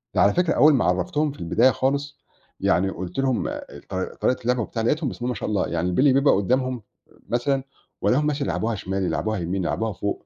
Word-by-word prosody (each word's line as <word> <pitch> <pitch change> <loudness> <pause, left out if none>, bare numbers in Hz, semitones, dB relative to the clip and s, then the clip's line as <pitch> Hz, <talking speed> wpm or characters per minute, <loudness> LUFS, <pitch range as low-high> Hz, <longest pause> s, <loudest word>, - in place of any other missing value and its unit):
على 100 +3 +4
فكرة 175 -2 +2
أول 155 0 +6
ما 130 - +2
عرّفتهم 145 +12 0
في 145 - -14
البداية 115 +10 +3
خالص، 140 +4 -1 0.4
يعني 95 +2 +2
قُلت 90 +5 -5
لهم 130 -3 0 0.4
ط - - -9
طريقة 125 +7 -1
اللعبة 125 +1 +1
وبتاع 115 +1 -3
لقيتهم 150 +3 +1
بسم - - -9
الله - - 0
ما 125 - -2
شاء - - -4
الله، 100 -3 0
يعني 85 +2 -1
البِلي 130 +9 +4
بيبقى 140 +2 +4
قدّامهم 125 +4 0 0.5
مثلًا، 135 +2 0 0.4
والاقيهم 150 +4 +2
مثلّا 145 -1 -1
يلعبوها 115 0 -1
شمال 95 -1 -3
يلعبوها 110 +3 -1
يمين 90 +2 -2
يلعبوها 110 +5 -1
فوق، 100 +3 -4
120 Hz, 200 wpm, -24 LUFS, 95-135 Hz, 0.5 s, أول